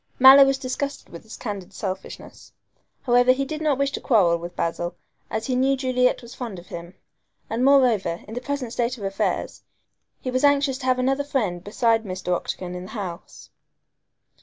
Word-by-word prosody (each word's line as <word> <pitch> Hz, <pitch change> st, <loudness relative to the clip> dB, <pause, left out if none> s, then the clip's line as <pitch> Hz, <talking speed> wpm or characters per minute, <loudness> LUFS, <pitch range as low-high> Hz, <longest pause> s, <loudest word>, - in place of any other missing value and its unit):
Mallow 265 Hz, +2 st, +9 dB
was 270 Hz, 0 st, +1 dB
disgusted 275 Hz, +2 st, -4 dB
with 170 Hz, -, -10 dB
this 220 Hz, -, -11 dB
candid 200 Hz, -4 st, -6 dB
selfishness. 190 Hz, -1 st, -7 dB, 0.5 s
However, 245 Hz, +1 st, +5 dB
he 275 Hz, +1 st, -2 dB
did 305 Hz, +3 st, -5 dB
not 300 Hz, -4 st, +1 dB
wish 280 Hz, 0 st, 0 dB
to -, -, -5 dB
quarrel 180 Hz, -8 st, +3 dB
with 175 Hz, +1 st, -8 dB
Basil, 175 Hz, +1 st, -2 dB, 0.3 s
as 220 Hz, 0 st, -3 dB
he 255 Hz, -, -1 dB
knew 270 Hz, +2 st, +2 dB
Juliet 255 Hz, -1 st, +1 dB
was 235 Hz, -, -11 dB
fond 230 Hz, -7 st, -6 dB
of 175 Hz, +1 st, -13 dB
him, 170 Hz, +2 st, -8 dB, 0.6 s
and 230 Hz, +3 st, 0 dB
moreover, 250 Hz, -10 st, +3 dB
in 220 Hz, -, -9 dB
the 245 Hz, -, -4 dB
present 265 Hz, -4 st, -4 dB
state 245 Hz, +1 st, -1 dB
of 210 Hz, -, -9 dB
affairs, 195 Hz, 0 st, -2 dB, 0.6 s
he 255 Hz, -, -4 dB
was 255 Hz, +2 st, 0 dB
anxious 280 Hz, -2 st, +3 dB
to 260 Hz, -, -7 dB
have 255 Hz, 0 st, +3 dB
another 270 Hz, +2 st, +1 dB
friend 215 Hz, -12 st, -2 dB
besides 225 Hz, +2 st, +1 dB
Mr. 185 Hz, -2 st, -3 dB
Octagon 180 Hz, +1 st, -5 dB
in 180 Hz, 0 st, -6 dB
the -, -, -11 dB
house. 185 Hz, -3 st, -8 dB
245 Hz, 185 wpm, -24 LUFS, 190-265 Hz, 0.6 s, Mallow